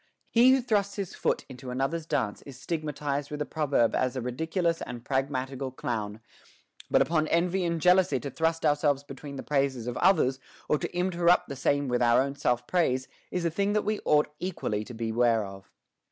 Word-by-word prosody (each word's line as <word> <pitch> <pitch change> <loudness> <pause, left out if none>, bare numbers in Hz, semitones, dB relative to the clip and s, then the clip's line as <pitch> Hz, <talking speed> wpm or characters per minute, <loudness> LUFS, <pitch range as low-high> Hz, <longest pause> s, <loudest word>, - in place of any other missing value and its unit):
He 240 +2 +6
who 265 0 +5
thrusts 205 -4 0
his 195 -4 -4
foot - - -1
into 130 -1 -9
another's 135 +6 -2
dance 115 -10 -1
is 135 -2 -11
stigmatized 145 -3 -3
with 150 - -5
a 150 - -1
proverb 145 -8 +1
as 130 0 0
a 130 - -2
ridiculous 160 +7 -1
and 120 -1 -7
pragmatical 135 0 -2
clown; 110 -4 -4 0.7
but - - +5
upon 155 -1 0
envy 180 +3 +1
and 170 -1 -1
jeal 180 +3 +6
ousy 160 -8 +2
to 140 - -4
thrust 165 0 0
ourselves 145 -2 +2
between 140 0 -9
the 135 - -6
praises 135 -4 0
of 125 0 -4
others, 155 -8 +3 0.3
or 150 - +2
to - - -4
interrupt 175 -2 +2
the 140 - -4
same 140 +1 +1
with 125 -1 0
our 120 -1 +5
own 135 +1 0
self 125 -3 0
praise, 130 -7 +1 0.2
is 180 -1 -2
a 170 - +1
thing 200 +4 0
that 210 - +1
we 215 0 0
ought 150 0 +2
equally 110 - -2
to 120 - -9
beware 115 -1 +1
of. 95 -1 -11
145 Hz, 195 wpm, -28 LUFS, 125-170 Hz, 0.7 s, He